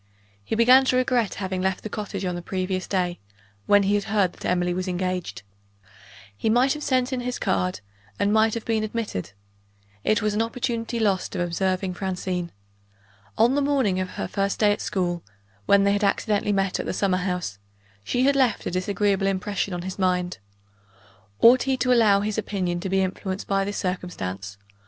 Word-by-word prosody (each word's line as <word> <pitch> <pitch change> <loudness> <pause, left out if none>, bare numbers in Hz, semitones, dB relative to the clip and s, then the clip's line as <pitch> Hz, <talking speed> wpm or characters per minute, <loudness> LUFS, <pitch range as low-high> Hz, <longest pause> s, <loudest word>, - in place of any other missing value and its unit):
He 105 - -2
began 250 +4 +6
to 255 - +2
regret 250 -5 +1
having 190 -1 -3
left 190 0 -1
the - - -3
cottage, 200 -3 -4
on 180 - -1
the 175 - -5
previous 185 +1 -3
day, 180 -2 -1 0.5
when 205 0 +5
he 195 +1 +1
had 205 -1 +1
heard 200 -4 +1
that - - -11
Emily 180 0 +1
was 185 +1 -3
engaged. 180 - -3 0.9
He 220 - -1
might 250 +4 +4
have 300 - -7
sent 255 -2 +1
in 255 - -1
his 250 0 -3
card, 90 +1 -1 0.4
and 205 +1 +1
might 220 0 +3
have 230 - -5
been 220 -1 0
admitted. 215 - -4 0.7
It 215 - +2
was 215 -1 +1
an 210 - +1
opportunity 230 0 -2
lost 200 -3 0
of 180 - -1
observing 185 +2 -1
Francine. 180 -2 -3 0.9
On 235 +3 +4
the 285 - +2
morning 265 -10 +1
of 185 0 -2
her - - -2
first 195 -1 -1
day 210 -1 +4
at 205 - -1
school, 175 -3 -1 0.5
when 200 0 +5
they 200 - +3
had 205 +1 0
accidentally 205 +1 +1
met 195 -2 0
at - - -3
the - - -1
summer 190 -2 +1
house, 180 - -3 0.4
she 245 - 0
had 280 +1 +4
left 260 -4 +2
a - - -2
disagreeable 195 +2 0
impression 195 0 -1
on 175 -1 -4
his 190 +1 -6
mind. 180 -1 0 1.0
Ought 245 +2 +7
he 265 0 0
to 250 0 +2
allow 210 -4 +5
his 215 +1 -1
opinion 185 -5 -2
to 190 +2 -4
be 190 0 +2
influenced 190 +1 -4
by 195 0 +1
this 205 +1 -4
circumstance? 100 - -4
195 Hz, 190 wpm, -24 LUFS, 180-220 Hz, 1.0 s, Ought